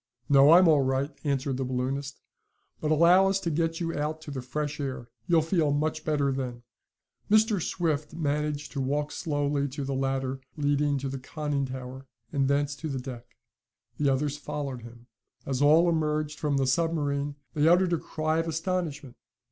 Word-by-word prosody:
"No, 140 Hz, +2 st, +7 dB
I'm 180 Hz, +1 st, +7 dB
all 150 Hz, -3 st, +5 dB
right," 135 Hz, +2 st, 0 dB
answered 140 Hz, -2 st, -1 dB
the 135 Hz, -, -1 dB
balloonist. 130 Hz, +2 st, -3 dB, 0.6 s
"But 155 Hz, -, -2 dB
allow 170 Hz, +5 st, +6 dB
us 195 Hz, 0 st, +1 dB
to 170 Hz, -, -1 dB
get 165 Hz, +1 st, 0 dB
you 165 Hz, -1 st, -2 dB
out 150 Hz, +2 st, -2 dB
to 155 Hz, -, -8 dB
the 135 Hz, -2 st, -4 dB
fresh 150 Hz, +4 st, -4 dB
air. 130 Hz, -4 st, -4 dB, 0.2 s
You'll 165 Hz, -2 st, +4 dB
feel 160 Hz, -3 st, +1 dB
much 155 Hz, +2 st, -1 dB
better 145 Hz, -3 st, +1 dB
then." 125 Hz, -3 st, -4 dB, 0.7 s
Mr. 215 Hz, -2 st, +4 dB
Swift 155 Hz, -3 st, -1 dB
managed 150 Hz, -1 st, -2 dB
to 140 Hz, -, -3 dB
walk 145 Hz, +3 st, -1 dB
slowly 145 Hz, -3 st, -1 dB
to 140 Hz, +1 st, -5 dB
the 135 Hz, -, -2 dB
ladder 135 Hz, 0 st, -1 dB, 0.2 s
leading 145 Hz, 0 st, +1 dB
to 135 Hz, 0 st, -3 dB
the 135 Hz, 0 st, -4 dB
conning 145 Hz, 0 st, -3 dB
tower, 130 Hz, +1 st, -8 dB, 0.3 s
and 140 Hz, -2 st, +2 dB
thence 140 Hz, +1 st, +1 dB
to 160 Hz, -, -5 dB
the 135 Hz, -, -3 dB
deck. 125 Hz, -2 st, -7 dB, 0.7 s
The 145 Hz, -1 st, +3 dB
others 145 Hz, +2 st, -1 dB
followed 140 Hz, -4 st, -5 dB
him. 120 Hz, +1 st, -13 dB, 0.4 s
As 135 Hz, -1 st, -2 dB
all 155 Hz, +4 st, +6 dB
emerged 155 Hz, -2 st, 0 dB
from 145 Hz, -2 st, 0 dB
the 135 Hz, -, +2 dB
submarine 145 Hz, -1 st, 0 dB, 0.2 s
they 150 Hz, -1 st, +2 dB
uttered 175 Hz, +1 st, +4 dB
a 170 Hz, -, +1 dB
cry 155 Hz, 0 st, -1 dB
of 165 Hz, -, -1 dB
astonishment. 160 Hz, -5 st, -3 dB
145 Hz, 180 wpm, -27 LUFS, 135-155 Hz, 0.7 s, No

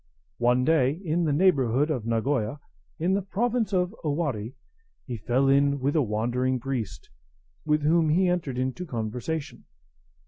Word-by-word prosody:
] -, -, -45 dB
One 125 Hz, +1 st, +3 dB
day, 145 Hz, -4 st, +3 dB
in 170 Hz, 0 st, 0 dB
the 150 Hz, -, +1 dB
neighbourhood 145 Hz, -4 st, +3 dB
of 120 Hz, -7 st, -3 dB
Nagoya, 115 Hz, +2 st, 0 dB, 0.4 s
in 180 Hz, +4 st, +1 dB
the 200 Hz, -, +1 dB
province 225 Hz, +3 st, -1 dB
of 180 Hz, 0 st, +1 dB
Owari, 145 Hz, -7 st, -2 dB, 0.5 s
he 125 Hz, -, -5 dB
fell 125 Hz, +5 st, +1 dB
in 140 Hz, +1 st, +3 dB
with 140 Hz, +3 st, 0 dB
a 155 Hz, -, +4 dB
wandering 125 Hz, +3 st, 0 dB
priest, 125 Hz, -3 st, -5 dB, 0.5 s
with 150 Hz, -1 st, +1 dB
whom 160 Hz, +1 st, +3 dB
he 180 Hz, +4 st, +3 dB
entered 170 Hz, -8 st, -1 dB
into 130 Hz, +7 st, -2 dB
conversation. 125 Hz, +6 st, -4 dB
140 Hz, 150 wpm, -26 LUFS, 125-165 Hz, 0.5 s, a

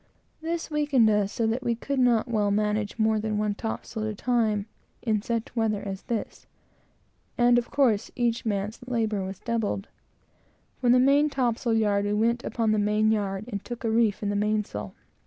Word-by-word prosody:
This 330 Hz, 0 st, -3 dB
weakened 290 Hz, -7 st, +3 dB
us 205 Hz, -1 st, +1 dB
so 230 Hz, -, -1 dB
that 225 Hz, +3 st, 0 dB
we 240 Hz, -2 st, 0 dB
could 275 Hz, +4 st, -3 dB
not 240 Hz, -3 st, +3 dB
well 215 Hz, -3 st, +1 dB
manage 210 Hz, +1 st, 0 dB
more 220 Hz, -1 st, +2 dB
than 215 Hz, 0 st, -2 dB
one 210 Hz, 0 st, 0 dB
topsail 220 Hz, +1 st, -5 dB
at 215 Hz, -, -1 dB
a 215 Hz, -, -5 dB
time, 220 Hz, -3 st, +1 dB, 0.4 s
in 215 Hz, -3 st, +1 dB
such 230 Hz, +2 st, -3 dB
weather 220 Hz, -3 st, +1 dB
as 195 Hz, -1 st, -5 dB
this, 235 Hz, -4 st, -5 dB, 0.9 s
and, 240 Hz, 0 st, +5 dB
of 240 Hz, -, -6 dB
course, 240 Hz, -8 st, +2 dB
our 220 Hz, -4 st, 0 dB, 0.2 s
labor 220 Hz, -5 st, 0 dB
was 190 Hz, 0 st, -5 dB
doubled. 220 Hz, -2 st, -2 dB, 0.9 s
From 245 Hz, -1 st, +4 dB
the -, -, +6 dB
main 280 Hz, +3 st, +4 dB
topsail 240 Hz, -3 st, 0 dB
yard, 205 Hz, -2 st, +2 dB
we 205 Hz, -, 0 dB
went 235 Hz, +3 st, +1 dB
upon 225 Hz, -2 st, 0 dB
the 215 Hz, -, +2 dB
main 210 Hz, +1 st, +2 dB
yard, 200 Hz, -2 st, -1 dB
and 205 Hz, -5 st, -5 dB
took 240 Hz, -1 st, -7 dB
a 225 Hz, -, 0 dB
reef 220 Hz, -2 st, +2 dB
in 205 Hz, -, 0 dB
the 205 Hz, -, -1 dB
mainsail. 205 Hz, -, -2 dB
220 Hz, 185 wpm, -26 LUFS, 210-240 Hz, 0.9 s, the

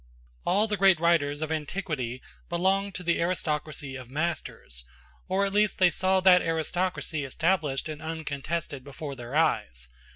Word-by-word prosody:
All 210 Hz, +3 st, +4 dB
the 210 Hz, -2 st, -1 dB
great 190 Hz, -3 st, +5 dB
writers 155 Hz, -3 st, +2 dB
of 155 Hz, -, -3 dB
antiquity 150 Hz, -6 st, -3 dB, 0.3 s
belonged 190 Hz, +3 st, +1 dB
to 180 Hz, -, -6 dB
the 170 Hz, -1 st, +1 dB
aristocracy 155 Hz, -5 st, -2 dB
of 130 Hz, -2 st, -9 dB
masters, 145 Hz, -, -4 dB, 0.4 s
or 195 Hz, +1 st, +2 dB
at 195 Hz, -, -3 dB
least 210 Hz, 0 st, +2 dB
they 180 Hz, -2 st, +5 dB
saw 190 Hz, +4 st, +2 dB
that 180 Hz, -1 st, +7 dB
aristocracy 165 Hz, -1 st, -1 dB
established 155 Hz, 0 st, 0 dB
and 155 Hz, 0 st, -6 dB
uncontested 160 Hz, -2 st, -4 dB
before 140 Hz, +1 st, -7 dB
their 120 Hz, +2 st, -7 dB
eyes. 60 Hz, -, +1 dB
160 Hz, 150 wpm, -27 LUFS, 145-185 Hz, 0.4 s, that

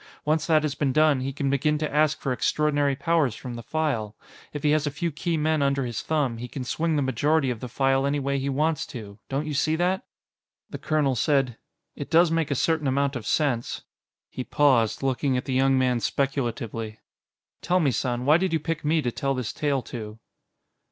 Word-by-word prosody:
Once 155 Hz, 0 st, +1 dB
that 155 Hz, -2 st, +4 dB
has 150 Hz, -3 st, -1 dB
been 145 Hz, -2 st, 0 dB
done, 155 Hz, -1 st, +4 dB
he 135 Hz, +1 st, -3 dB
can 140 Hz, 0 st, -3 dB
begin 140 Hz, +3 st, +1 dB
to 150 Hz, -1 st, -3 dB
ask 155 Hz, 0 st, +2 dB
for 130 Hz, -, -1 dB
extraordinary 145 Hz, +1 st, +1 dB
powers 160 Hz, -6 st, +1 dB
from 125 Hz, 0 st, -7 dB
the 120 Hz, -, -6 dB
File. 115 Hz, -6 st, -2 dB, 0.4 s
If 145 Hz, -, -6 dB
he 150 Hz, -, +3 dB
has 150 Hz, -1 st, +2 dB
a -, -, +2 dB
few 155 Hz, +4 st, -3 dB
key 165 Hz, +2 st, -2 dB
men 155 Hz, 0 st, +1 dB
under 140 Hz, -1 st, +1 dB
his 120 Hz, -3 st, -4 dB
thumb, 145 Hz, -7 st, 0 dB
he 125 Hz, -, -5 dB
can 130 Hz, +1 st, -6 dB
swing 160 Hz, +5 st, -1 dB
the 145 Hz, -, +1 dB
majority 135 Hz, +2 st, +1 dB
of 120 Hz, -, -5 dB
the 125 Hz, -, -6 dB
File 135 Hz, +2 st, +1 dB
any 145 Hz, +1 st, 0 dB
way 140 Hz, 0 st, -1 dB
he 135 Hz, +1 st, -2 dB
wants 150 Hz, +3 st, 0 dB
to. 105 Hz, -4 st, -9 dB
Don't 140 Hz, +3 st, -1 dB
you 150 Hz, -, -3 dB
see 155 Hz, +2 st, +1 dB
that?" 180 Hz, +3 st, 0 dB, 0.7 s
The -, -, -6 dB
colonel 150 Hz, -4 st, +1 dB
said: 130 Hz, -1 st, +1 dB, 0.4 s
"It 145 Hz, -, -6 dB
does 165 Hz, 0 st, +5 dB
make 165 Hz, -2 st, 0 dB
a 140 Hz, -, 0 dB
certain 155 Hz, +1 st, +1 dB
amount 140 Hz, +1 st, +1 dB
of 120 Hz, -, -5 dB
sense." 130 Hz, -6 st, 0 dB, 0.5 s
He 130 Hz, -, -4 dB
paused, 130 Hz, -5 st, +2 dB
looking 135 Hz, 0 st, +1 dB
at 125 Hz, -, -3 dB
the 135 Hz, -, -2 dB
young 135 Hz, +1 st, +3 dB
man 125 Hz, -2 st, +2 dB
speculatively. 120 Hz, -5 st, -2 dB, 0.6 s
"Tell 180 Hz, +1 st, +2 dB
me, 145 Hz, -6 st, +2 dB
son: 125 Hz, 0 st, -2 dB
why 150 Hz, +3 st, +6 dB
did 185 Hz, -1 st, -1 dB
you 160 Hz, -, +2 dB
pick 165 Hz, +1 st, -3 dB
me 155 Hz, +1 st, +1 dB
to 120 Hz, -, 0 dB
tell 135 Hz, +3 st, -1 dB
this 125 Hz, -4 st, -3 dB
tale 140 Hz, -4 st, 0 dB
to?" 110 Hz, -2 st, -7 dB
140 Hz, 215 wpm, -25 LUFS, 130-155 Hz, 0.7 s, why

